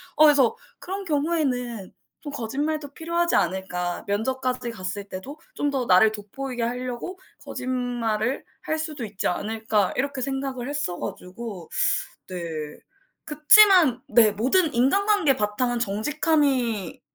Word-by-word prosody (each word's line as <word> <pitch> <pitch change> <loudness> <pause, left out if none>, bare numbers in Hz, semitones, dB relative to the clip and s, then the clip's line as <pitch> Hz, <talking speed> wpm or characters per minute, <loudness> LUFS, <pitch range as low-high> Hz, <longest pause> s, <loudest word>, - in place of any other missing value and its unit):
어 310 - +5
그래서 285 -6 +5 0.2
그런 390 +2 -5
경우에는 280 - -1 0.3
좀 290 - -6
거짓말도 285 +4 -3
필요하지 340 +2 0
않을까. 180 -1 -1
면접까지 250 +4 -1
갔을 200 -1 -5
때도 275 +12 -8 0.2
'좀 290 -1 0
더 260 -3 -1
나를 190 +4 +6
돋보이게 240 +4 -5
하려고 250 +8 -4 0.2
거짓말을 245 -1 -2 0.2
할 315 - -2
수도 305 -5 -4
있지 205 -2 -3
않을까.' 215 +1 0
이렇게 275 +1 -1
생각을 270 -1 -3
했어 285 -12 -2
가지고 185 -1 -7 0.6
네. 185 - -5 0.9
그치만 310 - +6
네 220 -1 +5
모든 285 - +2
인간관계 315 - +3
바탕은 240 +2 -1
정직함이 245 - 0
250 Hz, 285 characters per minute, -24 LUFS, 215-295 Hz, 0.9 s, 나를